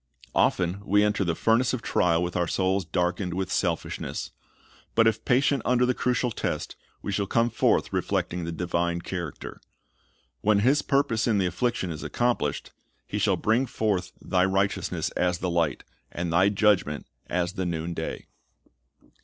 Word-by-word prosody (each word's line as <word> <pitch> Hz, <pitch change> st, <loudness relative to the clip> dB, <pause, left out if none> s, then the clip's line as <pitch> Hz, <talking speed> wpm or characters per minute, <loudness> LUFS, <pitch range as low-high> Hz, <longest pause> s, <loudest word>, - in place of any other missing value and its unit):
Often 90 Hz, +2 st, +1 dB
we 105 Hz, +1 st, +3 dB
enter 105 Hz, -1 st, +1 dB
the 85 Hz, -3 st, 0 dB
furnace 115 Hz, +6 st, +2 dB
of 125 Hz, -3 st, -3 dB
trial 85 Hz, -1 st, +2 dB
with 90 Hz, 0 st, -3 dB
our 85 Hz, -, +1 dB
souls 95 Hz, +1 st, 0 dB
darkened 90 Hz, +2 st, -1 dB
with 95 Hz, -1 st, -2 dB
selfishness; 85 Hz, -4 st, -2 dB, 0.6 s
but 115 Hz, -, +5 dB
if 110 Hz, 0 st, +2 dB
patient 135 Hz, +1 st, +3 dB
under 125 Hz, +1 st, +3 dB
the 125 Hz, -, +2 dB
crucial 125 Hz, 0 st, 0 dB
test, -, -, -3 dB, 0.3 s
we -, -, -3 dB
shall 100 Hz, 0 st, -1 dB
come 115 Hz, +3 st, +2 dB
forth -, -, +1 dB
reflecting 90 Hz, 0 st, -1 dB
the 85 Hz, -, -3 dB
divine 85 Hz, 0 st, -1 dB
character. 85 Hz, -4 st, -6 dB, 0.8 s
When 105 Hz, -1 st, +3 dB
His 135 Hz, +6 st, +4 dB
purpose 125 Hz, -5 st, +1 dB
in 110 Hz, -3 st, +3 dB
the 95 Hz, -, +2 dB
affliction 95 Hz, +1 st, -1 dB
is 80 Hz, -, -6 dB
accom 120 Hz, 0 st, 0 dB
plished, 75 Hz, -, -3 dB, 0.3 s
"He -, -, -3 dB
shall -, -, +2 dB
bring 115 Hz, +5 st, +1 dB
forth 95 Hz, -7 st, -1 dB
thy 90 Hz, -1 st, +1 dB
righteousness 95 Hz, +1 st, 0 dB
as 90 Hz, -1 st, 0 dB
the 90 Hz, 0 st, -2 dB
light, 85 Hz, -6 st, 0 dB, 0.3 s
and 85 Hz, -1 st, -3 dB
thy 95 Hz, +4 st, +5 dB
judgment 100 Hz, -8 st, +2 dB, 0.2 s
as 90 Hz, 0 st, -1 dB
the 95 Hz, -3 st, -2 dB
noonday." 85 Hz, 0 st, -4 dB
95 Hz, 160 wpm, -26 LUFS, 85-110 Hz, 0.8 s, but